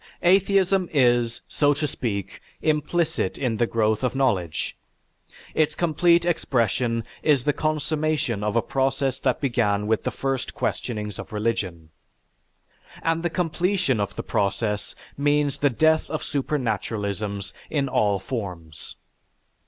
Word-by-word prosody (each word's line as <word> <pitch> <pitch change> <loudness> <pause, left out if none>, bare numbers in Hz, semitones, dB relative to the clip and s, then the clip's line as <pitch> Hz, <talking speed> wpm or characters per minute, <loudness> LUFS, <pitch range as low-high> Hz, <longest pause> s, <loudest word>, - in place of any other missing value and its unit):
Atheism 190 0 +3
is, 120 -4 +2
so 145 -1 +2
to 150 +2 -1
speak, 100 -8 -4 0.2
implicit 155 - 0
in 120 -5 -1
the 120 - +2
growth 110 0 +1
of 125 0 0
knowledge, 95 -12 0 0.8
its 155 -1 +2
complete 170 +1 +3
expression 120 -7 +1 0.2
is 145 -5 +3
the 145 - +2
consummation 155 -6 0
of 105 +1 -1
a 115 - +3
process 135 0 0
that - - +1
began 110 -6 +1
with 110 0 +1
the - - 0
first 135 -1 -3
questionings 105 -3 -3
of - - -8
religion. 105 -7 -2 1.1
And 165 0 +1
the 175 - 0
completion 175 - 0
of 100 - -2
the - - -4
process 105 +1 -1 0.2
means 145 -1 +2
the 145 - +4
death 155 +5 +2
of 155 - -3
supernaturalisms 105 -7 -2 0.2
in 140 -3 0
all 105 -5 +2
forms. 90 - -6
130 Hz, 130 wpm, -24 LUFS, 105-155 Hz, 1.1 s, the